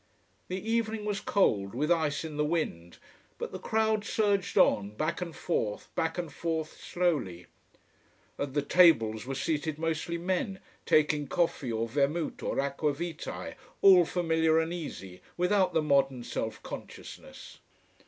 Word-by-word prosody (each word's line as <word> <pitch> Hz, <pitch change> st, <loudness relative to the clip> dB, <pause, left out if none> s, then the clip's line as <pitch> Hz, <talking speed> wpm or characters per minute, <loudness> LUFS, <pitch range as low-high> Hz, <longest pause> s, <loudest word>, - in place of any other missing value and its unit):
The 185 Hz, +4 st, -5 dB
evening 225 Hz, -2 st, 0 dB
was 205 Hz, -2 st, -1 dB
cold, 100 Hz, -, +1 dB
with 150 Hz, +6 st, 0 dB
ice 160 Hz, -2 st, +1 dB
in 155 Hz, -2 st, -6 dB
the 150 Hz, -, +1 dB
wind. 150 Hz, -, -2 dB, 0.4 s
But -, -, -5 dB
the -, -, -6 dB
crowd 220 Hz, -1 st, +1 dB
surged 205 Hz, -2 st, 0 dB
on, 105 Hz, +1 st, +3 dB
back 155 Hz, +7 st, -2 dB
and 170 Hz, -2 st, -5 dB
forth, 105 Hz, -11 st, -2 dB
back 160 Hz, +1 st, -1 dB
and 170 Hz, -5 st, -4 dB
forth, 160 Hz, -2 st, -3 dB
slowly. 140 Hz, -, -1 dB, 0.9 s
At 140 Hz, -1 st, -3 dB
the 145 Hz, -, +2 dB
tables 125 Hz, -10 st, +4 dB
were 135 Hz, -, -3 dB
seated 150 Hz, +2 st, -1 dB
mostly 165 Hz, +1 st, -2 dB
men, 185 Hz, +3 st, -1 dB, 0.3 s
taking 150 Hz, -1 st, +3 dB
coffee 150 Hz, -6 st, 0 dB
or 115 Hz, 0 st, -1 dB
vermouth 145 Hz, +6 st, -1 dB
or -, -, -2 dB
aqua 140 Hz, +2 st, 0 dB
vitae, 165 Hz, +2 st, -5 dB, 0.3 s
all 185 Hz, -3 st, +8 dB
familiar 160 Hz, -2 st, +2 dB
and 165 Hz, +1 st, -1 dB
easy, 95 Hz, -, -7 dB, 0.2 s
without 180 Hz, 0 st, +2 dB
the 160 Hz, -, +3 dB
modern 135 Hz, -4 st, +2 dB
self -, -, -4 dB
consciousness. -, -, -10 dB
160 Hz, 145 wpm, -29 LUFS, 140-175 Hz, 0.9 s, all